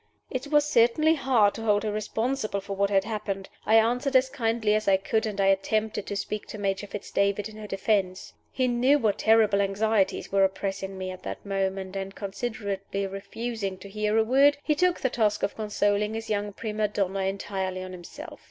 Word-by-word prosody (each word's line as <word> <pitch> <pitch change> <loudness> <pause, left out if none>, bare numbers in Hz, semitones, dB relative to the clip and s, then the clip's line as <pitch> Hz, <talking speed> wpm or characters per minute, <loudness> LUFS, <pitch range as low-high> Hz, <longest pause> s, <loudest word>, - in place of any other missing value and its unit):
It 260 +2 -3
was 295 0 +3
certainly 295 +3 +4
hard 245 -9 +3
to - - -7
hold 210 -2 +2
her 215 - -1
responsible 215 +1 -2
for 195 0 -6
what 200 0 +1
had 195 -1 +3
happened. 200 -3 -4 0.2
I 220 - +5
answered 245 +5 +2
as 260 0 +4
kindly 225 -4 0
as 215 0 0
I 195 -1 +5
could, 220 +3 -1
and 205 -2 -5
I 195 - +3
attempted 210 +2 +1
to 205 - -3
speak 210 +1 -4
to - - -7
Major 195 0 -2
Fitz 205 0 -7
David 200 +1 +1
in 215 0 -12
her 215 -1 -8
defense. 195 -2 -1 0.2
He 255 -1 0
knew 250 +4 +3
what 220 -7 0
terrible 220 -2 +4
anxieties 200 +1 0
were 195 0 +4
oppressing 195 0 -2
me 185 0 -4
at 185 - -9
that - - -7
moment; 195 -1 -2
and, 195 0 -5
considerately 200 -1 -4
refusing 200 +1 -4
to 200 +2 -11
hear 210 +1 0
a 225 - +5
word, 275 +5 +4
he 305 - +2
took 360 +3 +2
the 260 - 0
task 215 -4 +1
of 200 - -1
consoling 210 0 0
his 225 0 -5
young 205 0 -1
prima 215 0 -2
donna 195 -1 -1
entirely 190 -1 -2
on 185 - -7
himself. 175 -2 -10
210 Hz, 200 wpm, -27 LUFS, 195-225 Hz, 0.2 s, I